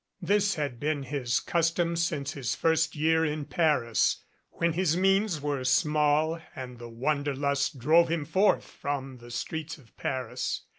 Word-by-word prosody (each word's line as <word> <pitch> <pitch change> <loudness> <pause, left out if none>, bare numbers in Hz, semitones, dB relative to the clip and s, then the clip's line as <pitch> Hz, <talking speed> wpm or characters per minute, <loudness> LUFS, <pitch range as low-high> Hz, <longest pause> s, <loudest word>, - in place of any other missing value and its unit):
This 200 +1 +2
had 145 -6 -3
been 145 -1 -1
his 135 -3 -1
custom 170 0 0
since 155 -4 -1
his 135 -4 -2
first 160 0 +1
year 160 +2 +2
in 150 -1 -2
Paris, 145 -6 +1 0.3
when 170 -1 0
his 175 -1 +1
means 195 -2 +2
were 145 -2 -2
small 150 +3 +2
and 125 -2 -8
the 120 0 -8
wanderlust 140 +3 -1
drove 160 +6 +4
him 165 -3 -1
forth 195 +7 +2
from 135 -2 -5
the 120 0 -13
streets 160 +6 -4
of 130 -6 -21
Paris. 125 -1 -3
150 Hz, 150 wpm, -28 LUFS, 135-165 Hz, 0.3 s, drove